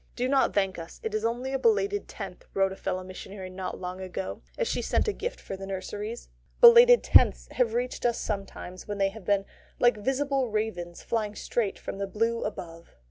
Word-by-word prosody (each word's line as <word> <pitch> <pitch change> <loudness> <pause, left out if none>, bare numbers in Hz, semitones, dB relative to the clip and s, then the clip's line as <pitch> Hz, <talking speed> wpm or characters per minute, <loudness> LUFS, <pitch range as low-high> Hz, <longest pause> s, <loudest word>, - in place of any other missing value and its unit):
"Do 250 0 0
not 270 0 +2
thank 195 -3 +1
us. 165 - -9
It 225 - -3
is 215 0 -1
only 245 +4 -1
a 270 - 0
belated 410 -3 +2
tenth," - - -8
wrote 195 0 +3
a - - -6
fellow 185 -1 -3
missionary 185 0 -8
not 185 0 -5
long 185 +1 -5
ago, 185 0 -5 0.2
as 485 - 0
she - - -1
sent - - +1
a 425 - +1
gift 480 - -4
for 195 - -6
the 195 0 -8
nurseries. 205 +4 -5 0.3
Belated 475 0 +9
tenths - - +5
have 235 -3 +1
reached 245 +1 -2
us 235 - 0
sometimes 195 -3 -5
when 205 -1 -3
they 195 -1 +2
have 205 -1 -12
been 200 0 +2 0.3
like 240 -2 +4
visible 270 +3 0
ravens 200 -6 -3
flying 215 -3 -2
straight 215 -2 -1
from 195 - -7
the 200 - -2
blue 230 +3 0
above. 170 -5 -7
210 Hz, 200 wpm, -28 LUFS, 190-250 Hz, 0.3 s, Belated